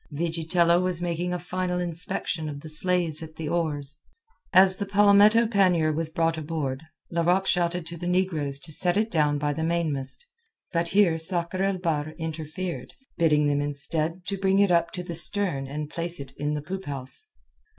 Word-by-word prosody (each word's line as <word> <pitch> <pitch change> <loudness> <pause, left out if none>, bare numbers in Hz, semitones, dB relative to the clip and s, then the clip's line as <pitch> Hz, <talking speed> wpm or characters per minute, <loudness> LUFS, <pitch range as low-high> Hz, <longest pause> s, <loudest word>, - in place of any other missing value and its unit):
Vigitello 170 +2 +1
was 180 -2 -1
making 175 0 -2
a 180 - -1
final 180 0 -3
inspection 170 -2 -3
of 145 -1 -7
the 155 - -9
slaves 165 0 +1
at 160 -1 -9
the 160 - -5
oars. 150 -4 -1 0.5
As 190 0 +6
the 200 - -4
palmetto 205 +3 +5
pannier 180 -8 +2
was 160 +1 -1
brought 165 0 0
aboard, 150 -4 -3 0.3
Larocque 175 +3 +2
shouted 175 -2 0
to 170 +1 -7
the 175 - -4
negroes 170 -6 0
to 160 - -4
set 175 +4 +3
it 220 +1 0
down 150 -4 +2
by 145 0 -1
the 160 - -3
mainmast. 160 - -2 0.5
But 170 0 +1
here 175 -3 +3
Sakr 175 +2 +1
el 195 -1 +1
Bahr 155 -3 -2
interfered, 160 +2 -5 0.2
bidding 150 -3 +3
them, 145 0 +1
instead, 155 +4 -2
to 195 -1 -3
bring 195 0 +2
it 200 -2 +4
up 170 -1 +3
to 180 - -4
the 175 - -6
stern 170 -4 0
and 150 +2 -5
place 170 +2 -3
it 140 - -8
in 150 +1 -2
the 150 - -4
poop 190 +4 -6
house. 135 -2 +1
170 Hz, 180 wpm, -26 LUFS, 155-180 Hz, 0.5 s, As